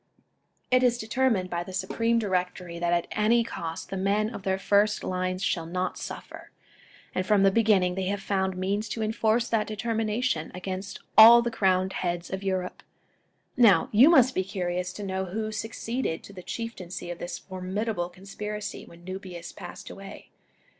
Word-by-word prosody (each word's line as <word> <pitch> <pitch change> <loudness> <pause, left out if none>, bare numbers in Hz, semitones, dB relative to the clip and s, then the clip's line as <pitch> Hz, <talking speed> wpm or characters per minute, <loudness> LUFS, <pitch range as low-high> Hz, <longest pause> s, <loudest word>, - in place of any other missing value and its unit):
It 255 0 +5
is 245 -1 +3
determined 225 -5 0
by 175 0 -1
the 185 - -10
Supreme 230 +5 0
Directory 180 -4 -2
that 175 0 0
at 175 -1 +2
any 230 +3 +3
cost, 165 -7 -6
the 195 - -2
men 205 +4 +1
of 205 - -6
their 190 0 0
first 205 +2 +2
lines 185 0 -2
shall 165 -4 -1
not 180 +2 -2
suffer; - - -8 0.6
and 185 - 0
from 200 0 +3
the 195 - +5
beginning 200 -4 +3
they 190 0 -2
have 200 +1 -1
found 190 -1 -1
means 200 +3 -1
to 225 - -2
enforce 220 +2 +1
that 220 -2 +1
determination 220 -4 -1
against 190 +1 -5
all 235 +2 +10
the 235 - -1
crowned 190 -3 +1
heads 175 -2 -3
of 190 0 -3
Europe. 185 -2 -2 0.7
Now, 210 -9 +5
you 240 +8 +7
must 260 -6 +6
be 185 - 0
curious 180 -2 -3
to 205 - -7
know 190 -1 -2
who 215 +4 -3
succeeded 220 -2 -3
to 200 - -12
the 185 - -9
Chieftaincy 185 -5 -6
of 175 - -7
this 175 0 -5
formidable 185 0 -3
conspiracy 205 +3 -6
when 170 +1 -15
Nubius 185 -2 -7
passed - - -9
away. 195 0 -11
195 Hz, 170 wpm, -27 LUFS, 185-220 Hz, 0.7 s, all